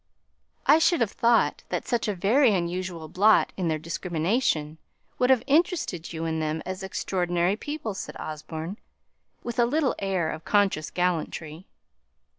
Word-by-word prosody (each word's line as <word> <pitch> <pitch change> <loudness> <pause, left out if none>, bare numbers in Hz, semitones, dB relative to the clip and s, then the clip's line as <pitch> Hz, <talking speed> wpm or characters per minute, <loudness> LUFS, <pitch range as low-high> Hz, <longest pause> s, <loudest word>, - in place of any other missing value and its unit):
"I 305 - +6
should 340 0 +3
have 220 -3 +1
thought 235 0 +2
that - - -3
such 240 -3 0
a 210 - -1
very 220 +5 +4
unusual 175 -2 -3
blot 210 +7 +4
in 180 -3 -2
their 160 -1 +1
discrimination 165 - -1 0.4
would 250 - +3
have 260 -3 +4
interested 305 - +1
you 165 0 -4
in 160 -1 -1
them 155 0 -2
as 185 +1 -5
extraordinary 180 -1 0
people," 290 -3 -5
said 190 - -7
Osborne, 160 +5 -6 0.6
with 240 +1 -4
a 240 - +5
little 290 +1 +1
air 185 -5 0
of 160 - -7
conscious 200 -7 +1
gallantry. 170 -1 -2
185 Hz, 150 wpm, -26 LUFS, 165-230 Hz, 0.6 s, I